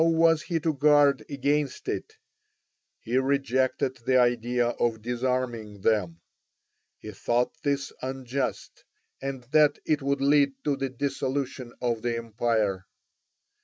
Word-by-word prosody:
How 165 - +5
was 165 -1 +4
he 170 0 -2
to 160 -1 +1
guard 145 0 +4
against 140 0 -1
it? 440 0 -4 0.8
He 120 +3 -1
rejected 130 -1 0
the 130 +2 +1
idea 120 0 +2
of 115 -2 -1
disarming 120 -4 -2
them; 90 -6 0 0.8
he 110 - -9
thought 120 +5 0
this 140 -2 -1
unjust, 130 0 -4 0.4
and 135 -2 -4
that 150 -1 +5
it 155 -1 +1
would 140 +1 0
lead 140 0 +4
to 145 -2 +1
the 135 0 -3
dissolution 130 -1 -3
of 120 -2 0
the 120 0 -1
empire. 110 -4 -1
130 Hz, 130 wpm, -27 LUFS, 120-140 Hz, 0.8 s, How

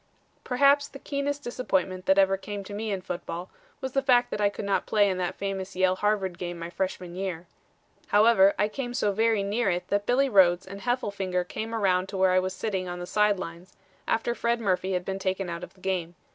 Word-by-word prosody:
"Perhaps 280 +3 +4
the 275 - -11
keenest 285 +1 -3
disappointment 190 -7 -2
that 190 - +5
ever 195 0 +5
came 200 +1 -6
to 205 - -9
me 215 +2 -3
in 195 -2 -2
football 175 -1 -6 0.3
was 265 - -3
the 275 - +1
fact 250 -3 +3
that 210 - -2
I 205 - +4
could 200 - -6
not 200 - 0
play 205 -1 +4
in 185 -2 -1
that 180 +1 -2
famous 195 -1 -4
Yale 185 0 +2
Harvard 200 -4 0
game 175 -1 -4
my 170 0 -6
freshman 180 -1 -3
year. 180 -3 -4 0.6
However, 205 -2 +5
I 205 - +2
came 245 +2 -5
so 205 - +1
very 220 0 +2
near 205 +2 0
it 175 0 -2
that 205 0 0
Billy 270 +3 +3
Rhodes 185 -6 +4
and 195 +1 -9
Heffelfinger 200 -7 -1
came 225 +4 -4
around 190 -3 +1
to 195 - -5
where 190 0 +4
I 185 - +4
was 185 0 -3
sitting 190 -3 -2
on 175 0 -5
the 175 - -5
side 210 +2 +2
lines, 175 0 -8 0.3
after 230 +1 +1
Fred 235 0 0
Murphy 190 -3 0
had 180 -1 -1
been 195 0 -3
taken 190 -1 -2
out 170 +1 -5
of 180 - -10
the 185 - -22
game. 180 -3 -2
195 Hz, 225 wpm, -27 LUFS, 185-220 Hz, 0.6 s, that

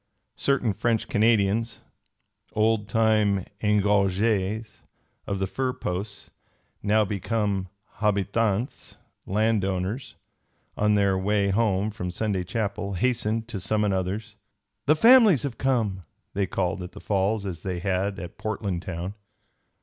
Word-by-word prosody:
Certain 130 -6 +1
French 115 +2 0
Canadians, 110 0 +2 0.7
old 110 -1 +1
time 110 -3 +2 0.2
engagés 105 +1 +1 0.5
of 100 - -1
the 95 - 0
fur 130 +6 -2
posts, 100 +1 -5 0.5
now 105 +1 +3
become 100 -1 -1 0.3
habitants, 105 +2 -1 0.3
landowners, 105 +1 0 0.6
on 105 0 +2
their 100 -2 +3
way 100 +1 +1
home 105 -1 +1
from 90 -4 -5
Sunday 95 +1 -1
chapel, 100 0 -3
hastened 115 +1 0
to 110 -4 -5
summon 105 +2 +1
others. 100 +4 -3 0.5
"The 150 - +6
families 220 - +7
have 135 -5 -4
come!" 110 -8 0 0.3
they 100 -1 0
called 90 +1 -1
at 90 0 -8
the - - -10
Falls, 100 +1 0
as 85 -5 -5
they 90 0 -3
had 95 +2 -1
at 90 -1 -8
Portland 100 -5 -2
town. 90 +1 -5
105 Hz, 120 wpm, -26 LUFS, 95-110 Hz, 0.7 s, families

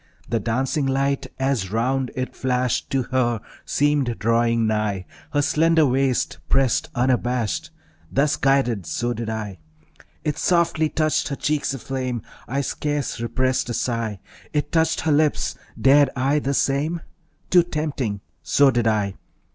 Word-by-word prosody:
The 115 - 0
dancing 130 +6 0
light 135 +1 0
as 130 -8 0
round 125 +3 0
it 130 0 -4
flashed 125 -2 0
To 135 -1 +1
her 120 -2 0 0.3
seemed 145 -5 +1
drawing 115 +1 +2
nigh, 105 -3 -1 0.3
Her 145 -1 +2
slender 160 +1 +3
waist 130 -1 +1
pressed 135 -3 +2
unabashed; 125 -2 0 0.4
Thus 140 +2 +2
guided, 125 -9 +1
so 120 0 -1
did 115 -1 -4
I. 105 -5 -4 0.6
It 155 -1 -2
softly 170 -2 +2
touched 155 0 +1
her 140 - -3
cheeks 145 -1 -1
aflame. 130 -2 -3 0.2
I 140 +3 -1
scarce 145 -3 -2
repressed 130 +2 0
a 120 - -2
sigh. 115 -4 -2 0.3
It 145 -1 -1
touched 160 -1 +2
her 160 - +1
lips. 150 0 +2 0.3
Dared 140 +1 +6
I 135 +3 +2
the 140 -1 -1
same? 150 +6 0 0.5
Too 180 - +7
tempting; 150 - -3 0.2
so 140 -1 +4
did 120 -2 +1
I. 105 -3 +1
130 Hz, 140 wpm, -23 LUFS, 115-145 Hz, 0.6 s, Too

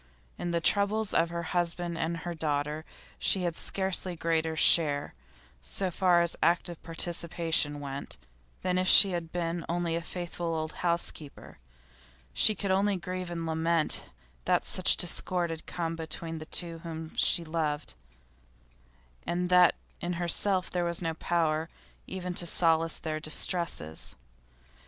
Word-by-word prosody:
In 175 - -3
the 170 0 +1
troubles 205 +4 +2
of 165 0 +3
her 170 0 -4
husband 175 0 -1
and 165 +1 -2
her 175 +2 -5
daughter 150 -1 -2 0.3
she 190 - +2
had 170 -2 -1
scarcely 190 -1 -1
greater 160 -1 0
share 145 -3 +3 0.5
so 185 - +1
far 175 -1 +3
as 170 -1 +1
active 170 0 +1
participation 165 -3 0
went 140 -1 -6 0.5
than 180 0 +1
if 185 - 0
she 195 0 +8
had 170 -2 -4
been 170 -1 -2
only 170 -1 -1
a 170 - -2
faithful 170 -1 -4
old 155 0 -3
housekeeper; 170 -4 -3 0.7
she 215 - +5
could 200 -2 -2
only 200 +1 +2
grieve 185 0 -5
and 170 -1 -4
lament 160 0 0 0.4
that - - +2
such - - +3
discord 175 -2 +1
had 160 -1 -7
come 165 -1 -3
between 165 0 -4
the 155 - -9
two 170 -2 0
whom 160 -1 -7
she 170 - +3
loved, 155 -2 -2 1.3
and 175 +1 -1
that 180 -1 +6 0.2
in 175 +1 -3
herself 180 +2 0
was 175 -1 -1
no 165 -1 -1
power 160 -1 0 0.4
even 180 -1 -4
to 175 0 0
solace 165 -1 +3
their 155 -1 -4
distresses. 155 - +1
170 Hz, 140 wpm, -29 LUFS, 160-175 Hz, 1.3 s, she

